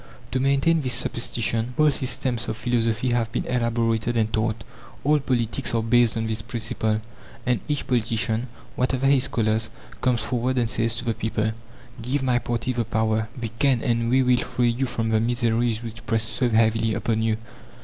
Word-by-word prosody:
To 130 - 0
maintain 140 +5 +3
this 130 -3 0
superstition 120 -1 -2
whole 155 -1 +5
systems 125 -3 -1
of - - -3
philosophy 115 +1 0
have 115 -2 0
been 120 - -2
elaborated 115 -1 0
and 110 -1 +1
taught; 110 -1 0 0.4
all 150 +1 +4
politics 125 -2 -1
are 115 - +1
based 115 0 +3
on 115 - -1
this 110 -1 -2
principle; 110 -1 -1 0.4
and 125 -3 +2
each 145 -1 -1
politician, 115 -1 0 0.3
whatever 130 +1 0
his 135 -1 +4
colours, 110 -2 0 0.3
comes 120 -3 +2
forward 125 +1 -1
and 120 -2 +2
says 115 0 +1
to 120 - -5
the 115 - +1
people, 110 0 -1 0.5
"Give 130 +4 -1
my 125 -2 +2
party 120 +1 -2
the 120 -1 0
power; 110 0 0
we 115 -2 -3
can 135 -5 +3
and 115 -1 +1
we 130 +2 +4
will 125 -1 +4
free 120 -1 +1
you 130 +3 -1
from 115 -2 -2
the 110 -1 +3
miseries 115 -1 +1
which 115 0 -8
press 115 -1 +1
so 125 +2 -1
heavily 110 0 +2
upon 110 -1 0
you." 110 -1 +1
115 Hz, 180 wpm, -24 LUFS, 110-125 Hz, 0.5 s, whole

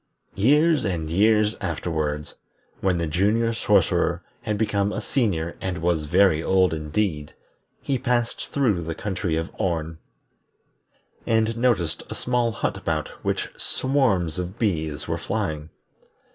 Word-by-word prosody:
Years 150 +9 +4
and 85 -6 -2
years 105 +3 +3
afterward, 75 -3 -2 0.5
when 95 -2 +1
the 85 - 0
Junior 105 +8 +2
Sorcerer - - +2 0.2
had 105 -1 -2
become 100 -2 +1
a - - -3
Senior 100 - -1
and 95 -2 -2
was 85 -2 0
very 90 0 +4
old 95 -1 +3
indeed, 75 0 -2 0.5
he 135 -2 0
passed 120 -2 -1
through 115 -11 +1
the 80 0 -4
country 90 -5 -2
of 80 +2 -2
Orn, 80 -3 -1 1.3
and 110 0 +2
noticed 115 -9 +1
a - - -5
small 120 -2 0
hut - - -2
about 80 -2 -2
which - - -1
swarms 100 - +1
of 90 +4 -5
bees 80 -10 -1
were - - -2
flying. 75 0 -3
95 Hz, 130 wpm, -24 LUFS, 80-110 Hz, 1.3 s, Years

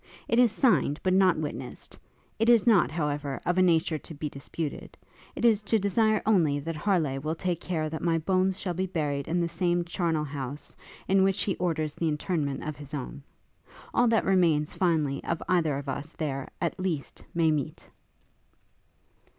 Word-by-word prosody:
It 230 - +2
is 245 -3 +5
signed, 220 - +2
but 185 - +2
not 190 -2 +4
witnessed: 145 -4 -6 0.4
it 225 +1 +3
is 235 -3 +5
not, 215 -8 +5
however, 145 -3 -2
of 180 +1 +1
a - - +6
nature 165 -3 +2
to 160 - -11
be 150 +1 -4
disputed; 145 +2 -6 0.4
it - - -1
is 220 -3 +4
to 215 +2 +1
desire 215 +2 +2
only 170 -9 +3
that 165 +3 -4
Harleigh 155 -6 0
will 155 +3 -2
take 175 0 -2
care 160 -4 -2
that 160 0 -5
my 165 -1 +2
bones 185 +3 +1
shall 180 -3 -2
be 185 +2 -2
buried 145 -5 -2
in 170 +2 0
the 170 - +1
same 175 +1 0
charnel 170 -3 -1
house, 140 0 -6 0.3
in 195 0 +4
which 195 +1 +2
he 195 - -1
orders 155 -4 -1
the 165 - -2
interment 150 -2 -2
of 155 -1 -5
his 145 0 -8
own. 140 +1 -6 0.7
All 245 - +4
that 225 -1 +2
remains, 165 -6 +2
finally, 155 -6 0
of 170 - -2
either 160 -6 +2
of 140 0 -7
us, 140 +3 -5
there, 140 -4 -3
at 170 +1 -2
least, 175 -7 -3
may 165 -2 +3
meet!' 145 -4 -3
165 Hz, 185 wpm, -28 LUFS, 150-185 Hz, 0.7 s, a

